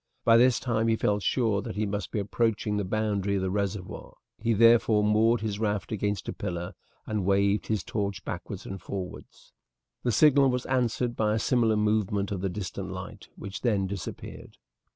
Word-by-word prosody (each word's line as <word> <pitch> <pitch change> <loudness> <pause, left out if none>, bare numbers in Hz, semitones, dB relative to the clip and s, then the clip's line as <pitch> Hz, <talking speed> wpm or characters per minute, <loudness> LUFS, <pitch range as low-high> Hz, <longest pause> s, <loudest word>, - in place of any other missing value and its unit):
By 115 - +6
this 125 0 +4
time 115 -2 0
he 115 - +3
felt 105 -2 0
sure 110 -3 +1
that - - -6
he 105 +1 0
must 100 -2 -3
be - - -4
approaching 105 0 0
the 105 - 0
boundary 100 0 -1
of 95 - -1
the 95 - -1
reservoir. 100 -1 -4 0.2
He 115 +1 +1
therefore 115 -1 +5
moored 110 +2 +3
his 105 -2 -3
raft 105 -3 -1
against 105 -1 -2
a - - -3
pillar 85 -3 -4 0.3
and 105 -3 -2
waved 100 +2 +2
his 110 -2 -1
torch 100 -3 -3
backwards - - -6
and 95 0 -7
forwards. 95 -2 -8 0.5
The 120 - 0
signal 140 +3 +5
was 125 0 -1
answered 125 -2 0
by 105 -1 +1
a - - +1
similar 115 -1 +2
movement 105 -1 0
of 95 -3 -3
the 95 - -1
distant 95 0 -5
light, 90 -1 -8
which 100 -1 -7
then 105 -6 +1
disappeared. 95 -3 -7
105 Hz, 185 wpm, -27 LUFS, 100-115 Hz, 0.5 s, By